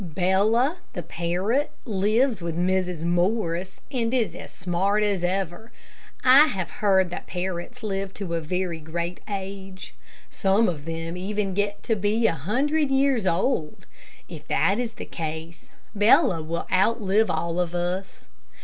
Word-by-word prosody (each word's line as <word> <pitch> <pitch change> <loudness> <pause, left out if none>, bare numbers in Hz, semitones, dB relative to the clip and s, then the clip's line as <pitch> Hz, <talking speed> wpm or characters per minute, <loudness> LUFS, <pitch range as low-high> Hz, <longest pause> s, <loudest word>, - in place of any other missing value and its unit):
Bella, 195 - +2 0.2
the 175 - -4
parrot, 180 - -1 0.2
lives 215 +1 +1
with 170 -1 -3
Mrs. 180 -2 0
Morris, 175 +1 0
and 235 -4 0
is 220 -9 +1
as - - -9
smart 190 +4 0
as 200 -4 0
ever. 190 +4 -2 0.5
I 270 +4 +8
have 190 - -3
heard 190 -3 +3
that - - -6
parrots 185 +6 -4
live 195 -2 -2
to 190 -4 -5
a 165 - 0
very 175 +1 -2
great 170 +3 -4
age. 195 -1 -6 0.4
Some 200 +3 +2
of 150 -5 -3
them 165 +1 -4
even 195 +1 -2
get 205 +1 -1
to 225 - +1
be 210 +3 +1
a 225 - +4
hundred 270 - 0
years 270 -6 +2
old. 185 - 0 0.4
If 155 -3 -10
that 200 +4 +2
is 235 -2 -2
the - - -8
case, 160 +1 -6 0.2
Bella 210 - +4
will 165 +2 -3
outlive 210 +2 +3
all 170 +1 -1
of 175 -1 -1
us. 180 +2 -3
190 Hz, 150 wpm, -25 LUFS, 175-215 Hz, 0.5 s, I